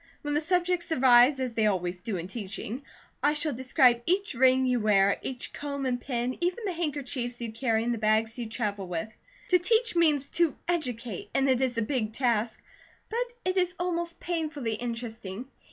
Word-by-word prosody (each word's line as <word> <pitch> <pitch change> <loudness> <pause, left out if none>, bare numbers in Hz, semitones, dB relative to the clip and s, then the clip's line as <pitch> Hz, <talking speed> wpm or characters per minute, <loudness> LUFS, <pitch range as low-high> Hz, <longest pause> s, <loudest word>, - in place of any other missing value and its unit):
When 295 0 -2
the 295 - +2
subjects 355 +1 0
arise, 255 -1 +6
as 255 -2 -2
they 220 -1 +2
always 180 -3 -1
do 205 0 -3
in 170 +1 -5
teaching, 215 +4 -5 0.4
I 295 +1 +3
shall 300 -1 +2
describe 250 -1 +3
each 390 +1 +1
ring 260 +1 +4
you 250 -1 +2
wear, 200 -2 +3
each 255 -2 -4
comb 280 -1 -4
and 245 -1 -1
pin, 245 -1 -2
even 360 +6 -1
the 380 - -1
handkerchiefs 275 -7 -3
you 235 -2 -4
carry, 225 -1 0
and 240 +1 0
the 230 - -4
bags 220 +2 +1
you 235 -2 -4
travel 205 -4 -3
with. 175 +3 -3 0.4
To 360 - +5
teach 450 +3 +2
means 300 -5 +3
to 335 -5 +3
educate, 245 - -2
and 270 0 +3
it 260 -1 +2
is 250 -3 0
a 230 - +2
big 220 -3 -2
task; 235 -3 0 0.5
but 475 +2 -2
it 370 +1 0
is 360 -1 +2
almost 345 -1 -2
painfully 310 -9 -2
interesting. 230 -2 -5
255 Hz, 185 wpm, -28 LUFS, 225-315 Hz, 0.5 s, arise